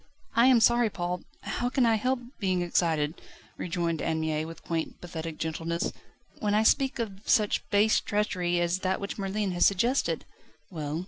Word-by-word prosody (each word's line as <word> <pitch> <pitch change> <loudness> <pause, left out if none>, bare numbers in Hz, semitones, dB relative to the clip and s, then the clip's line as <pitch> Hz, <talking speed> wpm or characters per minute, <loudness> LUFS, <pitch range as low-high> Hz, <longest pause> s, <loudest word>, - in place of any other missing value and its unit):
"I 235 +2 +6
am 255 -3 +6
sorry, 235 0 +4
Paul. 180 -2 -3 0.2
How 245 - -2
can 255 -1 +2
I 230 - +4
help 250 +4 0 0.2
being 185 -4 +1
excited," 160 -3 0 0.3
rejoined 170 -2 -2
Anne 160 -1 0
Mie 155 -1 -1
with 165 +1 -10
quaint, 165 -1 -3
pathetic 165 -2 -6
gentleness, 165 +1 -2 0.5
"when 210 -1 +1
I 215 - +4
speak 270 +4 +3
of 205 -5 -4
such 210 -2 +2
base 210 +2 +4
treachery, 180 -4 0
as 175 +1 +1
that 190 0 0
which 200 +1 -5
Merlin 195 0 -1
has 175 -1 +4
suggested?" 235 +8 +1 0.5
"Well? 155 -2 -3
185 Hz, 170 wpm, -28 LUFS, 165-215 Hz, 0.5 s, I